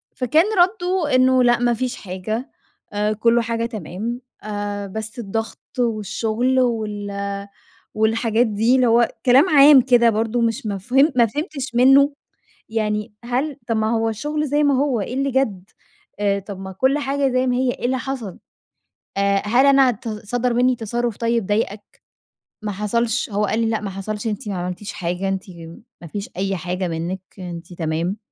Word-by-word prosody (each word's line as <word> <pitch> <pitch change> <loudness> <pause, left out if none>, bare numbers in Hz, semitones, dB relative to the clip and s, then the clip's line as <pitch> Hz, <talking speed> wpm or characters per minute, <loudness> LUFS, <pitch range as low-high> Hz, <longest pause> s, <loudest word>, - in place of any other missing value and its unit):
فكان 300 +7 +3
ردُّه 360 -5 +2
إنّه: 255 0 +4
"لأ 240 0 +4
ما 240 0 +2
فيش 250 +2 -2
حاجة، 210 +6 -5 0.4
آآ 210 +1 0
كل 230 +2 +3
حاجة 230 0 -2
تمام. 225 +3 -5 0.2
آآ 205 -1 -4
بس 220 +4 -6
الضغط 225 +1 -4 0.2
والشغل 230 +2 0
وال 205 -4 -2 0.5
والحاجات 225 +2 +2
دي." 225 +4 +2
اللي 255 -2 +3
هو 235 +1 +4 0.2
كلام 270 +8 +6
عام 285 -2 +8
كده 240 -2 +4
برضه 225 +2 0
مش 230 -1 -1
مفه 250 - +2
ما 235 - +5
فهمتش 275 - -5
منّه 270 +3 +6 0.6
يعني 210 0 -2
"هل 260 +4 -1
طب 230 - 0
ما 220 0 +1
هو 225 0 +1
الشغل 300 +7 -2
زي 295 +2 +1
ما 285 -1 +3
هو 260 -3 +1
إيه 235 +5 -4
اللي 275 +1 0
جد؟! 215 -8 -1 0.5
أ 200 -1 +2
طب 200 -1 -8
ما 190 0 -7
كل 260 +9 +1
حاجة 280 -1 0
زي 255 +1 +1
ما 250 -1 +1
هي 255 -1 +1
إيه - - -9
اللي 260 +1 0
حصل؟! 245 -7 -5 0.8
آآ 200 0 +2
هل 245 +6 +4
أنا 270 -2 +6
ت 230 0 -7
صَدَر 235 +3 -2
مِنّي 250 +1 +3
تصرُّف 235 0 -2
طيب 230 -3 0
ضايقك؟" 205 0 -3 0.6
ما 210 - -2
حصلش 225 +4 -1
هو 210 0 0
قال 220 +2 -1
لي: 230 - +1
"لأ 220 -1 -1
ما 200 - -4
حصلش. 205 +3 -5
أنتِ 215 +2 -4
ما 195 - -2
عملتيش 180 +3 -5
حاجة. 180 +2 -3
أنتِ 195 -1 -2 0.6
ما 170 - -9
فيش 200 +5 -6
أي 195 0 -1
حاجة 180 +2 -3
منِّك 170 +3 -3 0.2
أنتِ 175 -1 -8
تمام". 170 +4 -2
225 Hz, 170 wpm, -21 LUFS, 205-255 Hz, 0.8 s, عام